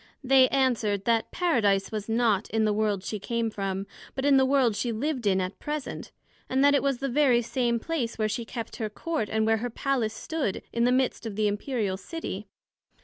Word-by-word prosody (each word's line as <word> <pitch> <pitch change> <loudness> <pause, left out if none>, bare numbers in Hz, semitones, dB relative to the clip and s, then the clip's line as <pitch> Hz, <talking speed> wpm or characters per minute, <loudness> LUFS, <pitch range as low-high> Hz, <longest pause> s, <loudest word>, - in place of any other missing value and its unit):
They 260 0 +6
answered, 235 -8 +1
That 230 -1 +2
Paradise 220 - +1
was 215 -1 -4
not 225 -3 +2
in 220 0 +1
the 210 - +2
world 205 -2 0
she 210 +1 -4
came 230 +2 -2
from, 195 -1 -3 0.3
but 265 +1 -2
in 280 -1 +6
that 265 0 +4
world 260 -5 +3
she 235 +3 -1
lived 250 0 -2
in 190 -1 +3
at 185 +1 -4
present; 300 -1 -5 0.4
and 265 +1 +2
that 285 0 +6
it 280 - +3
was 275 -2 0
the 275 - -2
very 255 -3 +3
same 235 -1 0
place 255 -4 -3
where 215 -1 +1
she 225 +2 -2
kept 230 0 -6
her 220 -3 -2
Court, 270 0 -3
and 220 0 +1
where 225 0 +3
her 245 +3 -3
Palace 240 -3 -1
stood, 305 - -3
in 235 0 +2
the 250 - +3
midst 255 -2 0
of 210 - -6
the 215 0 +2
Imperial 205 -2 -1
City. 210 - -6
235 Hz, 210 wpm, -27 LUFS, 215-265 Hz, 0.4 s, They